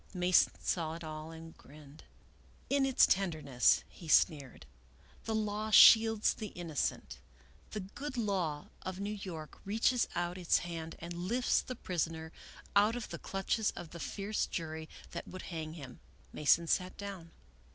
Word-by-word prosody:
Alason 180 0 +4
saw 160 -2 -1
it 170 - -9
all, 155 0 -6
and 165 0 -10
grinned. 150 +1 -15 0.3
" - - -29
In 275 -1 +3
its 265 - +6
tenderness," 155 -10 +2
he 170 - -13
sneered, 150 -4 +2 0.3
" - - -27
the 220 - -1
law 215 0 -1
shields 220 0 +7
the 215 - -6
innocent. 170 -6 -3 0.5
The 210 - -4
good 260 +8 -7
law 185 -9 -1
of 185 0 -5
New 205 +1 -3
York 175 -7 -8
reaches 225 +4 +2
out 175 +1 -2
its 175 - +3
hand 165 -2 -5
and 170 +1 -7
lifts 205 +9 +1
the 255 - -6
prisoner 165 -5 -3 0.4
out 210 +3 +5
of 245 - -5
the - - -6
clutches 195 +3 -1
of 170 -2 -8
the 170 - -8
fierce 205 +5 -2
jury 160 -1 -5 0.2
that - - -6
would 185 - -8
hang 160 -1 -4
him." 135 -7 -10 0.3
Mason 150 +3 +3
sat 180 +2 0
down. 195 -5 -7
175 Hz, 160 wpm, -33 LUFS, 160-210 Hz, 0.5 s, shields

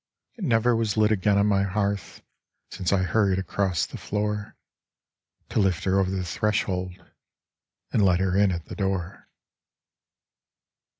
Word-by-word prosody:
It 225 - -9
never 120 -4 +3
was 115 -2 -1
lit 110 0 +4
again 100 -1 +2
on 100 - +3
my 100 -2 +2
hearth 100 -1 -2 0.5
Since 90 - -2
I 95 -2 +2
hurried 95 +1 +2
across 95 -5 0
the - - -9
floor, 105 0 -3 0.9
To - - 0
lift 95 -5 +1
her 95 0 +2
over 95 -1 +1
the 95 -1 -2
threshold, 90 -1 -1 1.0
and 105 - +3
let 90 -2 +4
her 95 -1 0
in 100 -1 +4
at 85 -2 -4
the - - -8
door. 95 -2 -3
100 Hz, 145 wpm, -25 LUFS, 95-105 Hz, 1.0 s, lit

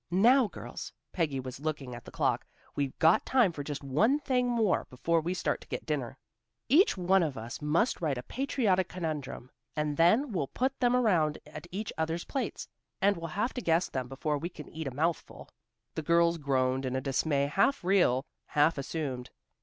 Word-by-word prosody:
"Now, 230 +8 +5
girls," - - -8 0.2
Peggy 150 -6 0
was 130 0 -7
looking 145 -4 -4
at 120 -1 -9
the - - -9
clock, - - 0 0.3
"we've 140 -2 -2
got 160 -1 +5
time 245 -8 +3
for 145 -3 -6
just 145 0 -5
one 210 - +3
thing 255 -4 0
more 225 -5 +1
before 165 +6 +1
we 175 +3 -2
start - - -1
to - - -14
get - - -5
dinner. 135 -5 -3 0.5
Each 305 - +5
one 185 +1 +3
of 150 -7 -1
us 115 +5 -6
must 165 +11 +1
write 150 -6 0
a 125 - -5
patriotic 215 - 0
conundrum, 155 -7 -5 0.2
and 150 -1 -1
then 220 - +4
we'll 170 -9 -1
put 260 - -2
them 245 -1 +3
around 175 -11 +2
at 155 +2 -10
each 205 +4 -4
other's 160 +2 -1
plates, 270 - -3 0.3
and 200 +1 +3
we'll 165 -1 -5
have 235 +5 0
to 250 - -4
guess 170 -2 +2
them 130 -2 -3
before 145 +3 -2
we 170 - -4
can 155 -4 -10
eat 160 -2 -5
a - - -3
mouthful." 160 +6 -2 0.4
The - - -3
girls 170 +1 +3
groaned 130 -2 +1
in 130 -1 -2
a - - +1
dismay 140 +1 +1
half 195 - +2
real, 175 -9 +3 0.2
half 150 +1 +2
assumed. 135 -4 -4
160 Hz, 195 wpm, -30 LUFS, 140-195 Hz, 0.5 s, Now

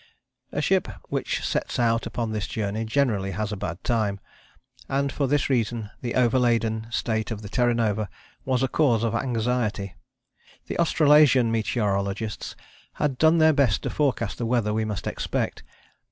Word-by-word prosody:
A - - -2
ship - - +2 0.2
which - - -2
sets - - -2
out 115 -1 +1
upon 115 -2 -3
this 105 -3 -2
journey 110 +1 -2
generally 110 -5 +1
has 105 -1 -2
a - - -2
bad 95 -3 -5
time, 110 -5 0 0.7
and 140 0 0
for 140 -1 -1
this 145 +1 +1
reason 115 -4 -1
the 120 -2 -3
overladen 115 -3 +2
state 110 -1 -1
of 110 -2 -5
the 105 - -7
Terra 120 +1 +2
Nova 110 -3 0 0.3
was 130 -1 0
a - - +3
cause 125 -6 +2
of 115 - 0
anxiety. 115 -4 -1 0.7
The - - -5
Australasian 150 -7 +5
meteorologists 105 -2 -1 0.4
had 140 -4 -1
done 160 +1 +5
their 160 -1 +5
best 135 -8 +2
to - - -2
forecast 130 -7 -1
the 120 - -1
weather 115 -3 +1
we 110 0 0
must 105 -3 -4
expect. - - -2
115 Hz, 160 wpm, -25 LUFS, 110-130 Hz, 0.7 s, Australasian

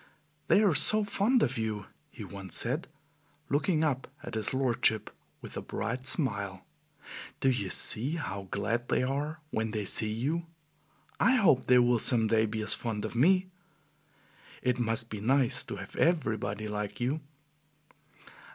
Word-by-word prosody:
"They 210 - +4
are 195 -5 +3
so 215 +8 +5
fond 210 +5 +1
of 130 -2 -1
you," 105 -3 -3 0.2
he - - -10
once 95 -3 -1
said, - - +2 0.6
looking 155 +3 +1
up 135 -4 -1 0.2
at - - -8
his 110 -2 -2
lordship 120 -5 0 0.3
with - - -10
a - - -4
bright 125 +4 -4
smile. 100 - -1 0.7
"Do 135 - +2
you 100 -6 -2
see 130 - +2
how 100 - -5
glad 115 +5 -2
they - - +1
are 145 +5 -3
when 110 0 -2
they 105 -1 -3
see 105 +2 +2
you? 150 +10 -2 0.7
I 255 +5 +4
hope 190 - +3
they 125 - +5
will 120 -1 +3
some 115 0 +5
day 110 0 +2
be 110 0 -4
as 110 +1 +2
fond 110 -2 -3
of - - -6
me. 185 +8 +3 1.1
It 125 0 0
must 115 0 0
be 105 -2 -6
nice 130 +2 +2
to - - -6
have - - -10
EVERYbody 110 - 0
like 105 -1 -5
you." 135 +6 -1
120 Hz, 160 wpm, -29 LUFS, 110-150 Hz, 1.1 s, so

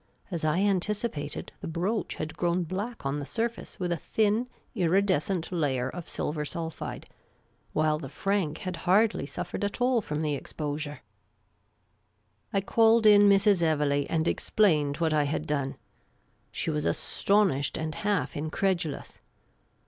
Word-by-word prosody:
As 170 -3 -3
I 155 +4 +2
antici 205 +3 +1
pated, 145 0 -6
the - - -5
brooch 180 +7 -1
had 155 0 -5
grown 175 +1 +1
black 200 - -5
on 140 +2 -1
the - - -4
surface 230 -1 -3
with 180 -2 -1
a 170 - +1
thin 220 - +1 0.3
iridescent 185 -2 +1
layer 135 -7 0
of 170 +4 -8
silver 150 0 -2
sulphide, 165 +1 -5 0.7
while 155 0 +2
the 135 -4 -7
franc 190 0 -1
had 185 -2 -5
hardly 205 -4 +3
suffered 175 +6 -5
at 205 +3 -2
all 245 -1 +3
from 150 -5 -3
the 150 -1 0
exposure. 145 +1 -4 1.5
I 195 - +1
called 225 +2 +4
in 205 -1 +8
Mrs. 200 -1 +4
Evelegh, 145 -3 +2
and 165 0 +1
explained 150 -9 +2
what 165 -2 +1
I 150 -1 +3
had 145 - -2
done. 140 -2 -1 0.8
She 165 - -2
was 150 -1 -1
astonished 195 -9 +1
and 160 0 -3
half 190 -10 -1
incredulous. 160 0 -2
170 Hz, 145 wpm, -28 LUFS, 150-200 Hz, 1.5 s, in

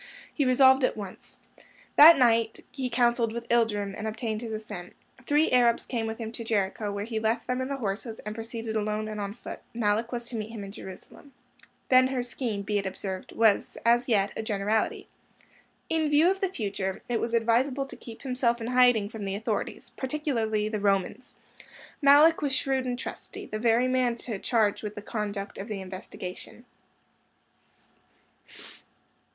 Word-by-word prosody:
He 285 - +1
resolved 265 +1 +5
at 255 - +1
once. 200 -3 -8 0.6
That 320 +3 +10
night 230 -3 +2
he 260 -3 -3
counselled 235 -1 +2
with 235 +1 -6
Ilderim, 210 -4 +1
and 220 - -4
obtained 220 0 -3
his 230 -2 -5
assent. 215 -5 -7 0.3
Three 295 +2 +3
Arabs 240 -2 +3
came 230 -3 -2
with 220 0 -4
him 225 -2 -5
to 230 - -6
Jericho, 205 -1 -1
where 200 0 -3
he 225 -1 -3
left 225 +2 0
them 250 +1 -1
and 260 - -3
the 280 - -1
horses, 220 0 -4
and 210 - -5
proceeded 225 0 -5
alone 215 0 -1
and 215 -1 -5
on 200 +1 -4
foot. - - -8 0.2
Malluch 225 +1 0
was 240 -1 -4
to 240 - -6
meet 215 -1 -4
him 225 -3 -7
in 195 - -8
Jerusalem. 200 +8 -12 0.5
Ben 255 0 +6
Hur's 250 -2 -2
scheme, 225 -6 -3
be 205 +1 0
it 195 - -3
observed, 190 0 -6
was 220 -3 +2
as 240 +1 +4
yet 205 -5 +2
a - - -3
generality. 215 0 -1 0.8
In 320 -2 +1
view 305 +5 +5
of 385 - -4
the 385 - +1
future, 200 - -3
it 240 -2 -1
was 235 0 -1
advisable 250 +4 +2
to 270 - -10
keep 230 -3 -11
himself 250 -3 0
in 225 - -5
hiding 245 -4 +4
from 220 0 -7
the 195 0 -2
authorities, 210 - -3
particularly 240 -7 -1
the 215 -1 -2
Romans. 200 +4 -1 0.7
Malluch 295 +3 +6
was 280 -3 0
shrewd 265 -1 0
and 245 -1 -2
trusty; - - -7
the 215 - -5
very 235 +2 +3
man 255 -2 +1
to 230 -3 -5
charge 220 -3 +1
with 210 -1 -6
the 205 - -7
conduct 205 -3 -4
of 195 - -6
the 210 -3 -4
investigation. 185 +4 -8
230 Hz, 180 wpm, -27 LUFS, 210-250 Hz, 0.8 s, That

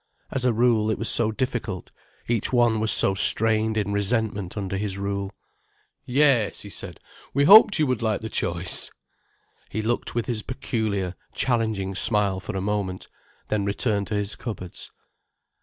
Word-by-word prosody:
As 130 -2 0
a 125 - +4
rule, 115 -2 +2
it 110 - 0
was 115 - +1
so 110 -2 +2
difficult, 110 -5 -4 0.4
each 115 -2 -1
one 120 -3 +3
was 110 0 0
so 95 - +4
strained 110 +2 +3
in 100 -1 -1
resentment 100 -2 -1
under 95 -1 -3
his 100 -1 -3
rule. 100 0 -3 0.8
"Yes," 130 -4 +2
he 100 - -10
said, 80 - -9 0.4
"we 140 - +3
hoped 200 +4 +8
you 155 - +2
would 130 -4 -1
like 110 -2 0
the 110 - -5
choice——" 85 -4 -4 0.8
He 110 - -3
looked 120 +1 -2
with 120 - -1
his 115 -3 -2
peculiar, 105 -6 -3 0.2
challenging 110 -6 -1
smile 100 -2 +1
for 95 - -6
a - - -2
moment, 100 -2 -3 0.4
then 105 -2 0
returned 100 0 0
to 105 - -3
his 105 0 -2
cupboards. 95 -7 -7
110 Hz, 160 wpm, -24 LUFS, 100-120 Hz, 0.8 s, hoped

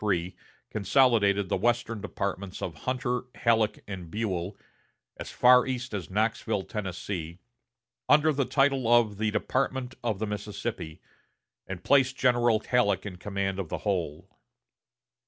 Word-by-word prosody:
3 90 -3 -1 0.4
consolidated 100 -3 +3
the - - 0
western 120 -2 0
departments 100 -2 -4
of 85 - -4
Hunter, 125 - -2
Halleck, 115 -2 +1
and 90 -4 -7
Buell, 95 -1 -3 0.6
as - - -7
far 125 +1 +5
east 130 -2 -3
as 100 -4 -4
Knoxville, 110 0 0
Tennessee, 90 -4 -5 0.7
under 150 +1 +5
the 140 -1 0
title 135 -4 +2
of 110 -4 +4
the 110 0 +1
Department 125 +4 -1
of 110 -4 0
the 110 - -2
Mississippi, 105 -6 -5 0.6
and 95 -1 -6
placed 135 -2 +3
General 120 -3 +3
Halleck 100 -7 +1
in 95 -3 -6
command 100 0 -3
of 90 -5 -4
the - - -2
whole. 90 -3 -2
105 Hz, 135 wpm, -28 LUFS, 95-120 Hz, 0.7 s, far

